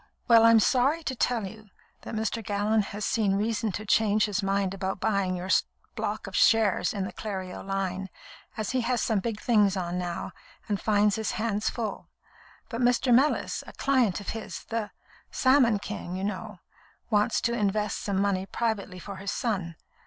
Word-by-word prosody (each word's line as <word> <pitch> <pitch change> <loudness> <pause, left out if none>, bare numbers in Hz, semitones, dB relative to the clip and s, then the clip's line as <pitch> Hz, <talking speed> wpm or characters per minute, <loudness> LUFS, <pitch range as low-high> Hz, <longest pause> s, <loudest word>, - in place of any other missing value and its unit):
Well, 230 -2 +7
I'm 230 -1 +7
sorry 270 +9 +2
to 265 - -3
tell 235 -3 0
you 215 +2 -10 0.3
that - - -7
Mr. 220 +1 -2
Gallon 210 +1 +1
has 205 +1 -5
seen 205 -4 +1
reason 215 +1 0
to 215 - -5
change 215 0 +3
his 210 -2 -1
mind 195 -1 0
about 190 0 -3
buying 200 -4 0
your 180 +1 -5 0.4
block - - -3
of - - -7
shares 220 -4 +4
in 200 -2 -2
the - - -7
Clerio 190 -4 -5
line, 195 -1 -3 0.5
as 215 -2 -2
he 255 -1 +1
has 240 +1 0
some 215 -1 +1
big 210 +1 -3
things 205 -5 +3
on 180 -1 -2
now, 175 0 -4 0.4
and 205 -2 -1
finds 210 -1 +3
his 220 - -2
hands 215 -2 -1
full; 230 -3 -4 0.6
but 230 +1 -4
Mr. 245 +1 +3
Mellis, 275 +5 +2
a - - -10
client 255 -9 +2
of 200 - -6
his 225 -1 -6
'the 225 -2 -3 0.4
Salmon 255 -5 +4
King,' 200 -3 -6
you 190 - -4
know 210 0 -4 0.5
wants 210 -1 +3
to 235 - 0
invest 210 -1 0
some 200 -2 -1
money 195 -1 0
privately 220 -6 -2
for 195 +1 -8
his 195 +1 -5
son. 185 -8 -2
210 Hz, 180 wpm, -27 LUFS, 195-230 Hz, 0.6 s, Well